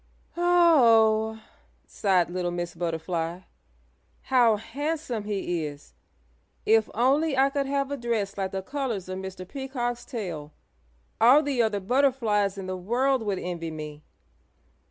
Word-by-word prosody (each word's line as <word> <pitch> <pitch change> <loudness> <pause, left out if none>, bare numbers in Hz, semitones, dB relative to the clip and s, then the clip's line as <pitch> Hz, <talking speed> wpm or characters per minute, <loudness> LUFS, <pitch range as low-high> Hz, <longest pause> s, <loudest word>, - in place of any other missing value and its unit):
"Oh 235 -11 +4
oh!" 220 - -19 0.4
sighed 185 -4 +1
little 180 -1 -2
Miss 175 0 -4
Butterfly. 165 0 -3 0.8
"How 245 -4 +4
handsome 250 +1 -4
he 190 -5 -2
is! 145 0 -12 0.7
If 220 0 +4
only 275 +5 +2
I 270 +1 +4
could 280 -1 -1
have 275 0 -1
a 285 - -2
dress 225 -5 -2
like 195 -1 -2
the 190 0 -4
colors 255 -7 -3
of 185 0 -4
Mr. 190 -1 -7
Peacock's 245 -1 -4
tail 170 - -6 0.7
all 260 +7 +7
the 275 -4 0
other 215 -3 +1
butterflies 215 -3 +1
in 195 - -5
the 185 0 -3
world 245 +8 +1
would 205 -3 -2
envy 175 -2 -4
me. 150 -1 -8
220 Hz, 135 wpm, -26 LUFS, 185-265 Hz, 0.8 s, all